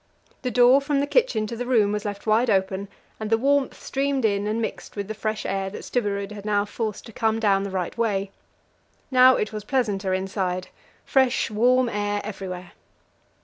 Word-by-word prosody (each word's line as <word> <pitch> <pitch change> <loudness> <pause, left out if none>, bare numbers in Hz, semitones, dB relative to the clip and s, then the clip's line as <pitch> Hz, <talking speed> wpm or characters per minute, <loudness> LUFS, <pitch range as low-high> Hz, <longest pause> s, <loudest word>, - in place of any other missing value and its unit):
The 255 - -1
door 250 +3 +5
from 280 0 0
the 280 - +1
kitchen 290 - +2
to 230 - -5
the 245 +1 -4
room 220 -5 +3
was 210 0 -3
left 205 -1 -5
wide 225 +3 +3
open, 190 0 0 0.3
and 215 -1 -4
the 225 - +4
warmth 275 +3 +1
streamed 275 -2 -1
in 205 -1 +1
and 215 +2 -1
mixed 225 - -5
with 200 -2 -4
the 220 - -4
fresh 215 0 -3
air 195 0 -1
that 200 - -8
Stubberud 200 -4 -2
had 205 -1 -8
now 205 -1 +1
forced 215 0 -4
to 225 - -12
come 220 +1 0
down 200 -3 +3
the 200 - -3
right 185 -2 -3
way. 200 -4 -1 0.8
Now 255 0 +7
it 210 - -2
was 210 -1 -5
pleasanter 205 -6 0
inside 185 -1 -2 0.4
fresh, 265 -3 +2
warm 250 +4 +3
air 205 -2 -1
everywhere. 185 -3 -6
215 Hz, 190 wpm, -24 LUFS, 200-245 Hz, 0.8 s, Now